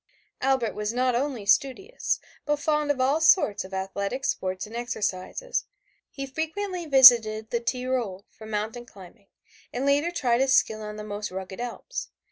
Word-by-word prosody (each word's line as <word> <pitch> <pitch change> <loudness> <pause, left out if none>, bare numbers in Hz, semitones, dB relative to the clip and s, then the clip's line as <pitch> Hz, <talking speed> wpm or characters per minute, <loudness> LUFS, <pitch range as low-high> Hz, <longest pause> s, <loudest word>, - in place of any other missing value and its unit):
Albert 260 -4 +1
was 210 0 -2
not 250 +1 +1
only 250 -3 -2
studious, 275 - +1 0.2
but 295 - +1
fond 300 0 0
of 285 -2 +1
all 275 +5 +2
sorts 320 - +4
of 190 - -12
athletic 200 +7 -3
sports 185 -6 -2
and 220 +2 -11
exercises. 235 - -3 0.4
He 275 - -6
frequently 335 +5 -4
visited 230 -6 +7
the 235 - +1
Tyrol 240 -5 -2
for 220 - -13
mountain 220 +3 -4
climbing, 200 +1 -15 0.4
and 255 +3 -3
later 285 +4 +2
tried 250 -8 +1
his 265 -1 +4
skill 215 0 +2
on 210 0 -6
the 210 - -7
most 210 0 -5
rugged 190 +1 -7
Alps. 245 - -6
245 Hz, 160 wpm, -26 LUFS, 210-280 Hz, 0.4 s, visited